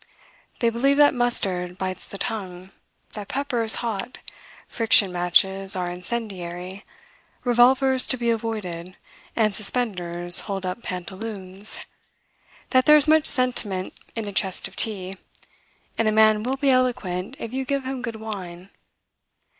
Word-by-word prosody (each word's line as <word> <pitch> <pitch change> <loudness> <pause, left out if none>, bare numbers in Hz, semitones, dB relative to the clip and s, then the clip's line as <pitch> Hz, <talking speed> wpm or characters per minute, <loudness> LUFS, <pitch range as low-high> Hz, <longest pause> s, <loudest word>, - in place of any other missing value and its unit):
They 235 -1 +2
believe 275 +5 +1
that 290 0 +5
mustard 190 -8 -1
bites 185 -1 -5
the 200 - -9
tongue, 190 -3 -6 0.4
that 205 -2 -8
pepper 275 -2 -2
is 225 -1 +5
hot, 225 +1 -4 0.5
friction 220 -4 +3
matches 190 +2 +1
are 180 -1 -3
incendiary, 180 -2 -6 0.6
revolvers 255 +2 +4
to 260 - +1
be 235 -1 0
avoided, 195 -6 -5 0.4
and 215 -2 +1
suspenders 180 -6 +2
hold 195 -1 -4
up 185 +5 -4
pantaloons; 190 +1 -1 0.9
that 255 +1 +3
there 300 0 +8
is 295 +1 +3
much 310 0 +4
sentiment 225 -8 +2 0.2
in 225 -2 -4
a 200 - -6
chest 190 -1 +2
of - - -17
tea; 195 -3 -1 0.8
and 225 - +2
a - - +3
man 215 0 +4
will 260 +4 -2
be 275 0 +2
eloquent, 240 -5 -1
if 230 -3 -7
you 265 0 -2
give 275 0 -2
him 260 -1 -5
good 230 -2 -5
wine. 195 -4 -8
215 Hz, 140 wpm, -23 LUFS, 185-245 Hz, 0.9 s, there